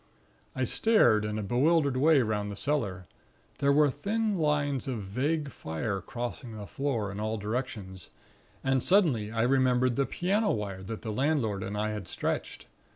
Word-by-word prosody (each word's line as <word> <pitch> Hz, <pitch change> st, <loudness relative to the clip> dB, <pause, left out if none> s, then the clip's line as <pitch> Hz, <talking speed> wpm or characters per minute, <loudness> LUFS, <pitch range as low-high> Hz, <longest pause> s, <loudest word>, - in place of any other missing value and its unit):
"I -, -, 0 dB
stared 120 Hz, -, +4 dB
in 105 Hz, 0 st, -2 dB
a 105 Hz, -, -2 dB
bewildered 140 Hz, -, +2 dB
way 145 Hz, 0 st, +5 dB
'round 105 Hz, -2 st, -1 dB
the 100 Hz, -, -5 dB
cellar; 100 Hz, -9 st, -2 dB, 0.5 s
there 140 Hz, 0 st, +3 dB
were 145 Hz, 0 st, +4 dB
thin 215 Hz, -, -1 dB
lines 145 Hz, -5 st, 0 dB
of 120 Hz, -6 st, -3 dB
vague 140 Hz, +9 st, -1 dB
fire 95 Hz, +4 st, -3 dB
crossing 120 Hz, +1 st, -6 dB
the 105 Hz, -, -7 dB
floor 115 Hz, -6 st, -2 dB
in 100 Hz, -, -6 dB
all 110 Hz, +1 st, -1 dB
directions; 105 Hz, -4 st, -4 dB, 0.5 s
and 135 Hz, -1 st, +2 dB
suddenly 145 Hz, -, +2 dB
I 115 Hz, 0 st, 0 dB
remembered 125 Hz, -1 st, +3 dB
the 140 Hz, -, +2 dB
piano 205 Hz, +5 st, 0 dB
wire 100 Hz, -3 st, -2 dB
that 110 Hz, +3 st, -7 dB
the 110 Hz, -, -3 dB
landlord 115 Hz, -5 st, 0 dB
and 100 Hz, +2 st, -4 dB
I 110 Hz, +1 st, 0 dB
had 105 Hz, -4 st, -5 dB
stretched. -, -, -3 dB
120 Hz, 165 wpm, -29 LUFS, 105-145 Hz, 0.5 s, way